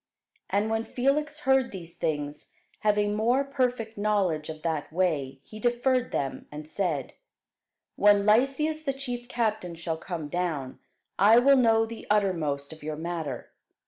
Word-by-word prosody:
And 205 +2 +1
when 225 0 0
Felix 295 +6 0
heard 265 -2 +3
these 170 -3 -7
things, 145 -1 -3 0.3
having 210 -1 +2
more 235 +6 +2
perfect 250 -5 -2
knowledge 195 -8 +1
of 155 -1 -7
that 160 -3 -2
way, 150 -7 -1
he 215 - -11
deferred 245 +2 +1
them, 135 -1 -3
and 150 +1 -8
said, 155 -6 -2 0.8
When 205 0 +5
Lysias 275 +8 +2
the 280 -3 -1
chief 245 -3 -5
captain 215 -8 -1
shall 165 -1 -3
come 165 -3 -5
down, 155 -5 -3 0.4
I 210 +4 +7
will 275 +3 +6
know 225 -3 +4
the 225 0 -9
uttermost 160 -9 0
of 160 - -14
your 155 0 -4
matter. 160 -6 -4
205 Hz, 145 wpm, -27 LUFS, 160-245 Hz, 0.8 s, I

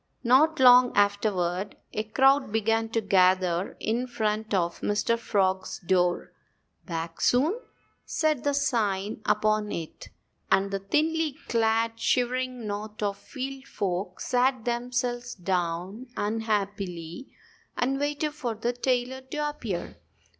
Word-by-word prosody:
Not 295 +6 +4
long 250 -1 +8
afterward 200 -2 +1 0.2
a 215 - 0
crowd 270 +3 +3
began 225 +1 +1
to 225 0 0
gather 185 -2 +2
in 240 +3 -1
front 220 -2 -2
of 175 -4 0
Mr. 210 +3 +1
Frog's 190 -4 0
door. 180 -1 0 0.5
"Back 165 -1 -5
Soon" 305 - +3 0.4
said 310 -5 0
the 285 -1 +1
sign 215 -7 0
upon 210 0 +2
it. 165 -2 -6 0.4
And 195 +1 +3
the 195 - -1
thinly 310 +8 0
clad, 225 0 +1
shivering 250 -1 0
knot 210 +1 -5
of 200 -1 0
field 270 +3 -7
folk 185 -6 -3
sat 255 -1 +1
themselves 245 0 -2
down 180 +5 -2
unhappily 200 -3 -2 0.5
and 270 +2 0
waited 295 +1 -1
for 245 -7 -3
the 235 +3 -1
tailor 250 +1 -1
to 295 +3 -3
appear. 220 -12 -5
225 Hz, 120 wpm, -27 LUFS, 195-255 Hz, 0.5 s, long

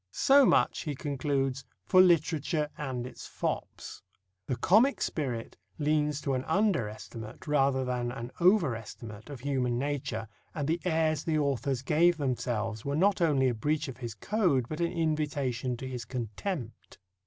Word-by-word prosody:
"So 275 -1 +5
much," - - +3
he 150 -3 -3
concludes, 135 -2 -1 0.2
"for 185 - +6
literature 160 -3 +2
and 130 -6 -4
its 125 -1 -9
fops." - - -4 0.5
The 130 - 0
comic 215 - +4
spirit 125 -7 -3 0.2
leans 150 -1 +1
to 140 - -1
an 130 0 -1
under 175 - +2
estimate 110 +1 -9
rather 135 -3 +2
than 125 -1 -2
an 120 -1 -6
over 175 - +4
estimate 110 0 -9
of 140 -4 -8
human 130 -3 0
nature, 140 -4 -2 0.3
and 145 -3 -2
the 165 +2 0
airs 160 -3 +1
the 160 -2 0
authors 140 -2 0
gave 165 +4 +3
themselves 115 -6 -2
were 140 0 -2
not 190 +4 +3
only 140 -6 +3
a 125 - +2
breach 150 +7 -1
of 130 - -7
his 120 -4 -6
code, 170 - +1
but 155 - -5
an 170 - +1
invitation 145 -6 -1
to 130 - -6
his 125 -2 -5
contempt. 120 - -5
140 Hz, 160 wpm, -29 LUFS, 125-155 Hz, 0.5 s, for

